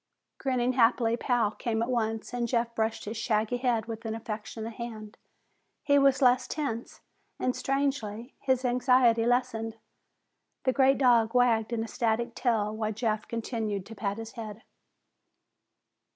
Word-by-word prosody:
Grinning 255 -2 0
happily, 235 -1 +3
Pal 240 -3 +1
came 225 0 -2
at - - -2
once 225 -2 -2
and 240 -1 -1
Jeff 235 -1 0
brushed 220 0 -1
his 215 +2 -5
shaggy 220 +1 0
head 240 -3 0
with 225 -1 -6
an 225 -1 -3
affectionate 220 0 -6
hand. 220 -2 -7 0.7
He 285 -1 +4
was 275 0 +4
less 250 0 +4
tense 270 -7 -4 0.4
and, 255 - 0
strangely, 270 -4 -2
his 260 -1 0
anxiety 245 -2 +4
lessened. 225 -2 0 0.9
The 260 - +2
great 270 0 +4
dog 240 -3 +4
wagged 235 -2 +3
an 230 -1 -1
ecstatic 230 0 -1
tail 220 -4 0
while 215 -1 -1
Jeff 215 0 -2
continued 220 -4 -3
to 225 - -10
pat 200 0 -2
his 225 0 -7
head. 220 -1 -8
230 Hz, 145 wpm, -28 LUFS, 220-250 Hz, 0.9 s, He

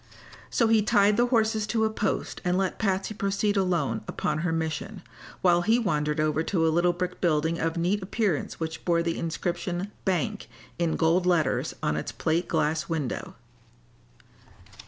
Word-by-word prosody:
So 230 - +2
he 220 -1 +4
tied 205 -1 +4
the 240 +2 +3
horses 220 -3 +1
to 220 0 +1
a - - +2
post 210 -2 -2
and 180 -1 +1
let 190 -1 -1
Patsy 195 0 0
proceed 200 0 0
alone 170 - 0
upon 155 0 -2
her 170 +1 -1
mission, 165 +5 -3 0.4
while 175 -1 +5
he 220 +6 +3
wandered 150 -9 0
over 155 0 +1
to 165 0 0
a 160 - +2
little 175 +1 +3
brick 180 +1 -4
building 160 0 +1
of 165 +1 -1
neat 185 +5 +1
appearance 190 -3 -1
which 160 -1 -4
bore 170 -1 +2
the 170 -1 -2
inscription 175 +3 -3
"Bank" 180 - -1 0.3
in 170 -2 +1
gold 170 +3 +2
letters 170 -4 +1
on 75 - +1
its 80 - -4
plate 160 +9 -1
glass 155 +1 0
window. 155 -6 -3
175 Hz, 165 wpm, -27 LUFS, 160-200 Hz, 0.4 s, while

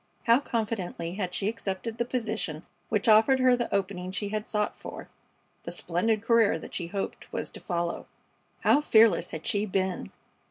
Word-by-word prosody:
How 235 +2 +6
confidently 210 -9 -3
had 185 -2 -3
she 200 - -1
accepted 220 +1 -3
the 235 - +1
position 220 -10 -3 0.2
which 210 -1 0
offered 220 +5 +6
her 255 -1 +5
the 240 -1 -3
opening 190 -2 -1
she 200 +1 -3
had 215 0 -3
sought 210 -1 0
for - - -9 0.5
the - - -6
splendid 210 +5 0
career 230 -2 +4
that - - -10
she 175 - -3
hoped 195 +3 -5
was - - -4
to - - -8
follow! 170 -2 -3 0.5
How 290 - +4
fearless 225 - +5
had 160 - -7
she 215 -2 +1
been! 190 - -1
210 Hz, 170 wpm, -28 LUFS, 185-230 Hz, 0.5 s, How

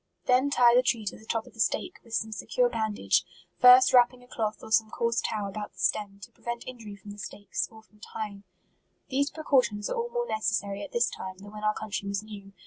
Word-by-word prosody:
Then 255 +2 +4
tie 245 -4 +5
the 250 - +6
tree 235 -3 0
to 200 - -3
the 220 - -17
top 225 -1 -1
of - - -16
the 225 - -18
stake, 365 - 0
with 230 -1 -5
some 220 0 -1
secure - - +1
bandage, 220 - +1 0.4
first 250 +1 +8
wrapping 250 0 +5
a - - -18
cloth 220 -3 -2
or - - -10
some 220 0 +4
coarse 235 0 0
tow 210 -2 -2
about 205 +1 -6
the - - -29
stem, 195 +3 0
to - - -10
prevent 235 0 -6
injury 230 -5 -8
from 200 +1 -11
the 205 - -11
stakes, 205 0 -4
or 220 -1 -15
from 215 -1 -26
tying, 210 -1 -7 0.7
These 280 +2 +1
precautions 255 -10 +1
are - - 0
all 470 0 -2
more 480 0 -1
necessary 205 - -1
at 200 - -7
this 235 0 +2
time, 185 0 -6
than 205 +2 -12
when 210 0 -9
our 215 0 +2
country 200 -1 -4
was 200 +1 -2
new. 205 -2 -10
220 Hz, 230 wpm, -28 LUFS, 205-250 Hz, 0.7 s, first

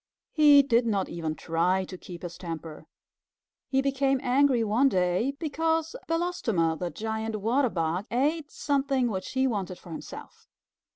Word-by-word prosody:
He 295 -2 +7
did 240 -3 +2
not 200 -4 0
even 160 -2 -3
try 180 +4 0
to 185 - -9
keep 180 -1 -10
his 175 -1 -6
temper. 165 -3 -7 0.8
He 270 0 +2
became 275 -1 +1
angry 255 -1 +3
one 230 +6 +3
day 185 +6 +1
because 325 - -1
Belostoma, 240 - 0
the 180 - -2
Giant 220 +2 -4
Water 240 +6 +1
Bug, 170 +3 -2
ate 295 +5 0
something 275 -4 0
which 190 -2 -5
he 260 0 +2
wanted 195 -7 -2
for 175 - -13
himself. 160 - -10
230 Hz, 150 wpm, -27 LUFS, 180-275 Hz, 0.8 s, He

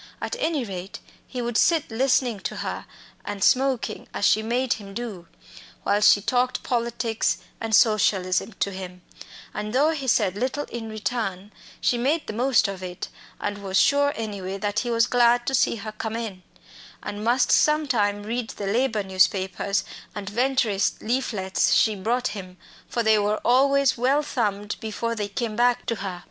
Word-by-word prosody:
At - - -3
any 325 - 0
rate, 190 -2 -7 0.3
he 250 -2 -4
would 235 -1 0
sit 325 -7 +2
listening 250 -2 +1
to - - -4
her - - -5 0.4
and 205 -1 -4
smoking, 255 -4 +1
as 205 - 0
she 215 - +4
made 240 +3 0
him 195 -2 -10
do 210 -8 -6 0.6
while 205 - +2
she 205 -1 +6
talked 250 +2 0
politics 235 -2 0 0.2
and 225 -1 +1
socialism 205 -3 +2
to 200 - +1
him; 180 -1 -8 0.5
and 210 +1 -4
though 290 +5 +4
he 280 -4 -4
said 205 -6 +2
little 260 +6 -1
in 225 -2 -5
return, 215 -3 -3 0.3
she 240 - +1
made 295 +6 +1
the - - -5
most 245 -1 +3
of 195 -2 -6
it, 180 -1 -6 0.3
and 205 0 -3
was 195 -1 -1
sure 285 0 +4
anyway 200 -4 -4
that 205 +1 -1
he 240 - -3
was 230 0 +3
glad 240 0 +3
to 270 - -1
see 250 - +3
her 215 0 -6
come 220 +1 -5
in, 220 -5 -5 0.6
and 205 0 -5
must 240 +4 +2
some 300 0 +4
time 205 -5 +1
read 230 +1 -3
the 205 - -6
labour 225 +1 +1
newspapers 190 +1 +1 0.3
and 205 -1 -5
Venturist 235 -4 +1
leaflets 215 -5 +1
she 220 - +4
brought 235 +5 -1
him, 185 -3 -8 0.3
for 235 - -1
they 220 -1 +4
were 210 +1 0
always 275 +1 +4
well 275 +5 +2
thumbed 210 -7 -2
before 225 +1 -3
they 210 -3 -3
came 215 +1 -3
back 245 +1 +2
to 230 - -2
her. 190 -3 -5
220 Hz, 175 wpm, -24 LUFS, 205-245 Hz, 0.6 s, she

